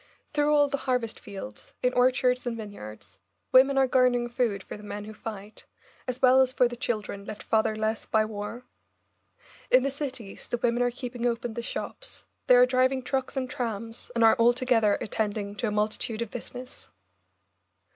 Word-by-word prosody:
Through 295 Hz, 0 st, +2 dB
all 290 Hz, -1 st, +5 dB
the 280 Hz, -, -1 dB
harvest 245 Hz, -3 st, 0 dB
fields, 195 Hz, -, -9 dB
in 250 Hz, 0 st, +2 dB
orchards 250 Hz, 0 st, +2 dB
and 235 Hz, -1 st, -2 dB
vineyards, 110 Hz, -, -10 dB, 0.3 s
women 270 Hz, +1 st, +6 dB
are 270 Hz, -, +5 dB
garnering 250 Hz, -2 st, +2 dB
food 235 Hz, -5 st, -1 dB
for -, -, -8 dB
the 210 Hz, -, -11 dB
men 205 Hz, 0 st, -6 dB
who 215 Hz, -, -8 dB
fight, 210 Hz, -1 st, -8 dB, 0.4 s
as 255 Hz, 0 st, -3 dB
well 260 Hz, +1 st, +7 dB
as 260 Hz, -1 st, +2 dB
for 250 Hz, -1 st, +3 dB
the 240 Hz, -, -7 dB
children 215 Hz, -5 st, -3 dB
left 210 Hz, +1 st, -8 dB
fatherless 220 Hz, 0 st, 0 dB
by 215 Hz, -1 st, +2 dB
war. 215 Hz, +3 st, -6 dB, 1.1 s
In 255 Hz, 0 st, +5 dB
the 275 Hz, -, 0 dB
cities 260 Hz, -7 st, -6 dB
the 240 Hz, -, -1 dB
women 240 Hz, 0 st, +1 dB
are 245 Hz, -, +3 dB
keeping 245 Hz, -1 st, -4 dB
open 235 Hz, -1 st, -2 dB
the 235 Hz, -, -4 dB
shops, -, -, -4 dB, 0.2 s
they 250 Hz, -, +7 dB
are 245 Hz, 0 st, +8 dB
driving 255 Hz, +1 st, +2 dB
trucks 265 Hz, +2 st, -2 dB
and 260 Hz, -1 st, -1 dB
trams, 230 Hz, -2 st, -4 dB
and 230 Hz, -, +3 dB
are 225 Hz, -, +7 dB
altogether 235 Hz, -3 st, +3 dB
attending 205 Hz, -2 st, -2 dB
to 240 Hz, -, -1 dB
a -, -, -1 dB
multitude 215 Hz, +2 st, -1 dB
of 230 Hz, -, -10 dB
business. 250 Hz, +1 st, -9 dB
240 Hz, 175 wpm, -27 LUFS, 215-255 Hz, 1.1 s, are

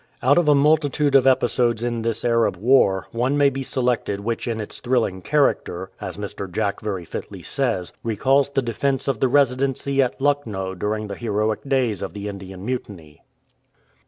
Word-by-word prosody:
Out 145 Hz, +6 st, +5 dB
of 170 Hz, -, 0 dB
a 145 Hz, -, +6 dB
multitude 145 Hz, 0 st, +2 dB
of 135 Hz, -1 st, +5 dB
episodes 120 Hz, -3 st, +2 dB
in 120 Hz, -1 st, -1 dB
this 115 Hz, 0 st, -1 dB
Arab 115 Hz, -4 st, +2 dB
war 100 Hz, -4 st, +3 dB
one 125 Hz, +5 st, 0 dB
may 140 Hz, -1 st, +4 dB
be 135 Hz, +1 st, -4 dB
selected 125 Hz, -6 st, -1 dB
which 115 Hz, +4 st, -3 dB
in 115 Hz, -1 st, -2 dB
its 105 Hz, -, -6 dB
thrilling 120 Hz, -7 st, 0 dB
character, 95 Hz, -10 st, 0 dB
as -, -, -6 dB
Mr. 100 Hz, -2 st, -6 dB
Jack 100 Hz, +2 st, -1 dB
very 95 Hz, -5 st, -4 dB
fitly -, -, -7 dB
says, 115 Hz, -10 st, -2 dB
recalls 135 Hz, +5 st, +2 dB
the 135 Hz, -1 st, 0 dB
defence 135 Hz, +4 st, -1 dB
of 135 Hz, -6 st, 0 dB
the 130 Hz, -, +3 dB
Residency 135 Hz, +1 st, +2 dB
at 130 Hz, 0 st, -1 dB
Lucknow 115 Hz, -10 st, -1 dB
during 105 Hz, +3 st, -2 dB
the 100 Hz, -, -6 dB
heroic 105 Hz, 0 st, -1 dB
days 125 Hz, -8 st, +1 dB
of 100 Hz, -, -5 dB
the 100 Hz, 0 st, -6 dB
Indian 95 Hz, -1 st, -8 dB
Mutiny. 95 Hz, -, -6 dB
120 Hz, 175 wpm, -22 LUFS, 100-135 Hz, -, a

